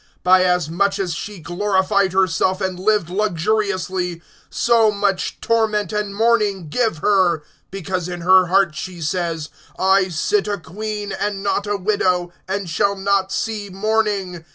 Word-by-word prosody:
(7)By 185 0 +6
as 180 -3 +1
much 195 +5 0
as 185 -4 -2
she 205 +4 -6
glorified 190 +3 0
herself, 185 0 +1
and 185 -2 -3
lived 205 -3 +1
luxuriously, 185 -2 -1 0.3
so 230 -2 +3
much 200 -2 -1
torment 215 -3 0
and 210 -1 -2
mourning 210 -6 +1
give 225 -1 0
her; 180 -6 +3 0.3
because 185 -2 -4
in 175 -1 -5
her 185 +1 +5
heart 190 -2 +3
she 180 +2 -7
says: 165 -1 -2 0.3
I 190 0 +3
sit 195 +5 0
a 205 -1 -1
queen, 205 +3 -5
and 200 0 -3
not 205 0 -1
a 205 0 0
widow, 180 -3 0
and 195 0 -3
shall 200 +4 +1
not 195 0 0
see 215 -2 -3
mourning. 200 -3 -1
195 Hz, 150 wpm, -20 LUFS, 180-205 Hz, 0.3 s, 7)By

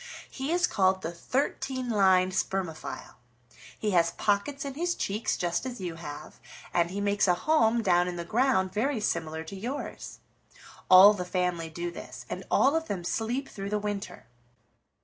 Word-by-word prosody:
He 270 +3 -4
is 355 +1 +3
called 190 -1 +1
the 165 - -3
Thirteen 260 +6 -2
lined 190 -4 +4
Spermophile. 185 -3 -4 0.6
He 210 - -1
has 170 -2 +3
pockets 245 +8 -1
in 275 - -4
his 345 +4 -1
cheeks 210 +3 -1
just 175 -1 -1
as 255 -3 -5
you 180 -3 -4
have, 155 -2 -9 0.3
and 170 -1 +2
he 195 +3 -4
makes 200 0 +1
a 180 - +4
home 230 - +2
down 175 -2 +3
in 180 - -3
the 170 -1 -5
ground 200 -3 +1
very 245 +4 0
similar 160 -6 -2
to 165 +5 -9
yours. 245 +9 -6 0.7
All 190 +3 +10
the 185 -3 -4
family 180 -2 -1
do 170 +2 -4
this, - - -9
and - - -4
all 280 +3 +4
of 325 0 -1
them 185 -3 -3
sleep 235 +9 -2
through 195 0 -6
the 210 - 0
winter. 205 - -5
200 Hz, 170 wpm, -28 LUFS, 175-245 Hz, 0.7 s, All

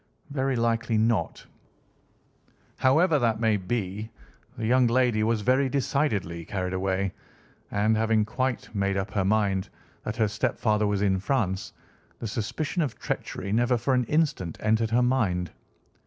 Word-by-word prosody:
"Very 135 -1 0
likely 115 -1 +1
not. 110 0 0 1.3
However 150 +4 +4
that 115 -3 +1
may 110 -2 +3
be, 105 +1 -3 0.5
the 110 - -3
young 125 +2 +4
lady 120 -2 +2
was 110 0 +1
very 130 +5 +2
decidedly 115 - -1
carried 90 +1 -3
away, 95 0 -1 0.6
and, 105 +2 +2
having 110 -1 +2
quite 125 +2 -2
made 100 -1 0
up 95 +2 -3
her 100 - 0
mind 100 -1 +1 0.3
that 110 - -4
her 110 -2 +3
stepfather 105 -1 0
was 100 -1 0
in 95 -2 +2
France, 95 -4 -1 0.5
the - - -7
suspicion 145 - -2
of 145 -7 -2
treachery 100 - -4
never 120 +3 +2
for 125 +4 0
an 125 -1 +2
instant 145 - 0
entered 110 +1 +1
her 120 +2 +3
mind. 105 -9 +1
110 Hz, 145 wpm, -26 LUFS, 100-125 Hz, 1.3 s, However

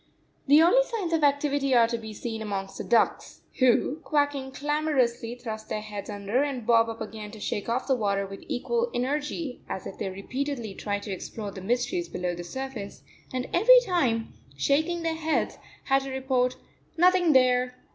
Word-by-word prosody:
The 295 +3 +7
only 425 +9 +6
signs 425 -9 -3
of 320 -2 +1
activity 285 -2 +2
are 235 -1 +7
to 235 0 -2
be 220 -1 -8
seen 225 +1 -5
amongst 195 -2 -4
the - - -3
ducks, 230 -2 +1 0.2
who, 255 +2 +3
quacking 285 -4 0
clamorously, 265 -5 0
thrust 220 -3 -7
their - - -1
heads 210 -1 -7
under 205 +4 -1
and 275 -5 -2
bob 230 -1 +4
up 225 - -7
again 215 -1 -6
to 215 +1 -11
shake 205 +1 -3
off 240 +3 0
the 270 - +2
water 200 -4 0
with 195 0 -9
equal 475 - -1
energy, 290 +2 -2
as 190 - -4
if - - -8
they - - -2
repeatedly 235 +3 -4
tried 205 0 -3
to 205 - -6
explore 200 +2 -5
the 190 - -9
mysteries 245 - -1
below 180 0 -2
the 175 0 -6
surface, 245 0 -6 0.3
and 255 0 -3
every - - +8
time, 250 - 0 0.2
shaking 315 - +1
their 330 -1 0
heads, 320 0 -1 0.2
had 270 0 +2
to 270 - -6
report, 260 -1 0 0.4
"Nothing 355 -1 +5
there! 250 -1 +3
255 Hz, 180 wpm, -27 LUFS, 220-290 Hz, 0.4 s, every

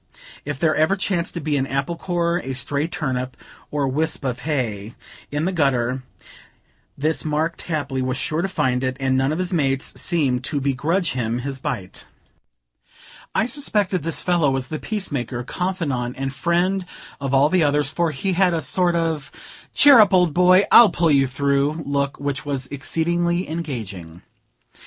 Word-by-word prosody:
If 145 -1 -4
there 155 +1 +2
ever 160 +5 +3
chanced 185 -3 -2
to - - -2
be 150 -2 -1
an 135 0 -1
apple 135 +5 -2
core, 170 0 -1
a 135 - -4
stray 140 +4 -2
turnip, 130 -6 -3 0.3
or 145 -2 -1
wisp 150 +2 -1
of 125 -1 -2
hay, 120 -7 -3 0.3
in 145 +2 -2
the 190 - 0
gutter, 130 -6 +1 1.0
this 155 +3 -1
Mark 155 +2 0
Tapley 145 -5 -3
was 130 0 -1
sure 155 +3 -1
to 195 - 0
find 130 -8 0
it, 130 0 -2
and 135 -1 +1
none 135 +2 +1
of 155 - -1
his 185 +1 -2
mates 135 -4 0
seemed 135 -8 0
to 145 - -1
begrudge 150 +7 0
him 120 -2 -2
his 135 -2 -4
bite. 95 -7 -5 1.3
I - - +3
suspected 210 - 0
this 165 +2 -3
fellow 175 -5 +2
was 135 -1 -2
the 155 - -4
peacemaker, 140 - -3
confidant 140 -7 -2
and 135 0 -3
friend 180 +5 0 0.4
of 135 -1 -1
all 140 +2 +5
the 185 +1 +2
others, 145 -2 +2
for 170 +1 0
he 170 +7 -2
had 180 -1 +3
a 160 - -1
sort 180 -2 +1
of 160 -4 -1 0.4
"Cheer 285 -4 +8
up, 205 -3 +6
old 180 -4 +3
boy, 180 +3 +5
I'll 235 -3 +9
pull 170 -2 +1
you 135 -2 +4
through" 140 +4 0
look, 140 0 -1
which 140 -1 -3
was 140 -3 -2
exceedingly 170 +6 0
engaging. 110 - -6
145 Hz, 170 wpm, -22 LUFS, 135-170 Hz, 1.3 s, I'll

